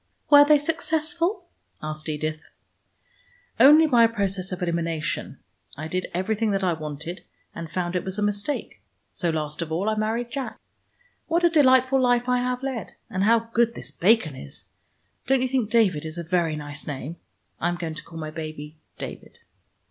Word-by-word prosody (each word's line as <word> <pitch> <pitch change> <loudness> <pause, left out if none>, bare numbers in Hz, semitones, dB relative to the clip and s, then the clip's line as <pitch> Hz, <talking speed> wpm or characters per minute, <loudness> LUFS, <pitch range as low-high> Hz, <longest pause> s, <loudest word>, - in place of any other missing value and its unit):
"Were 290 0 +10
they 300 +1 +6
successful?" 330 +5 -1 0.4
asked 155 +1 -4
Edith. 155 +1 -3 1.2
"Only 300 +6 +8
by 245 -6 +4
a 230 - +5
process 195 -4 -2
of 180 0 -4
elimination. 170 -2 -2 0.4
I 155 +2 -5
did 185 +3 -2
everything 210 +5 0
that 195 0 0
I 180 -2 +2
wanted, 155 +2 -6 0.3
and 165 -1 -7
found 175 +1 -2
it 180 - 0
was 190 +1 -4
a 210 - 0
mistake. 205 +7 -2 0.3
So, 175 - -1
last 155 -1 -3
of 165 -1 -4
all, 175 +6 -1
I 220 - +2
married 225 +3 -1
Jack. 270 -2 -4 0.7
What 340 +1 +1
a 345 - +5
delightful 260 -3 +5
life 245 -1 +2
I 250 0 +2
have 250 +1 -2
led, 260 -6 -4 0.2
and 190 +1 0
how 230 +1 +3
good 235 0 +2
this - - -8
bacon 185 - +2
is. 70 - -11 0.6
Don't 265 -1 +3
you - - +1
think 250 -4 0
David 210 -10 +3
is 160 +1 -6
a 170 - -3
very 170 -2 0
nice 145 -1 -7
name? 145 +3 -5 0.4
I 175 - +1
am 175 - -1
going 165 -2 -4
to 155 - -8
call 165 - -11
my 155 -1 -5
baby 155 -1 -7 0.2
David." - - -8
190 Hz, 180 wpm, -25 LUFS, 160-250 Hz, 1.2 s, Were